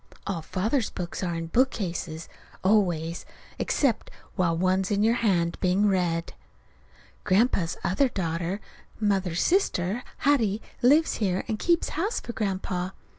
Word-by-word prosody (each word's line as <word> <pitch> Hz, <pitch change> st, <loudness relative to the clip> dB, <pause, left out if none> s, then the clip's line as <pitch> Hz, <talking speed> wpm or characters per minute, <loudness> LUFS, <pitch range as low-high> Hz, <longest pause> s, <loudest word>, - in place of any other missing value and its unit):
(All 190 Hz, -4 st, -2 dB
Father's 220 Hz, -, -1 dB
books 175 Hz, -2 st, -5 dB
are 175 Hz, -3 st, -1 dB
in 165 Hz, 0 st, -3 dB
bookcases, 170 Hz, -7 st, -1 dB, 0.4 s
always, 175 Hz, -5 st, +1 dB, 0.4 s
except 270 Hz, -7 st, +1 dB, 0.3 s
while 170 Hz, -3 st, +1 dB
one's 185 Hz, +2 st, +1 dB
in 205 Hz, -1 st, +1 dB
your 225 Hz, +1 st, +4 dB
hands 175 Hz, -6 st, +1 dB
being 190 Hz, +3 st, +3 dB
read.) 175 Hz, -4 st, 0 dB, 0.9 s
Grandpa's 185 Hz, -4 st, +2 dB
other 255 Hz, +9 st, +2 dB
daughter, 175 Hz, -1 st, -2 dB, 0.4 s
Mother's 195 Hz, -5 st, +1 dB
sister, 235 Hz, -, +1 dB, 0.2 s
Hattie, 225 Hz, -8 st, +3 dB, 0.2 s
lives 295 Hz, +6 st, +4 dB
here 190 Hz, -4 st, 0 dB
and 215 Hz, -, -2 dB
keeps 340 Hz, -1 st, +2 dB
house 390 Hz, +9 st, -1 dB
for 235 Hz, -, -7 dB
Grandpa. 185 Hz, -3 st, -2 dB
190 Hz, 125 wpm, -26 LUFS, 175-225 Hz, 0.9 s, your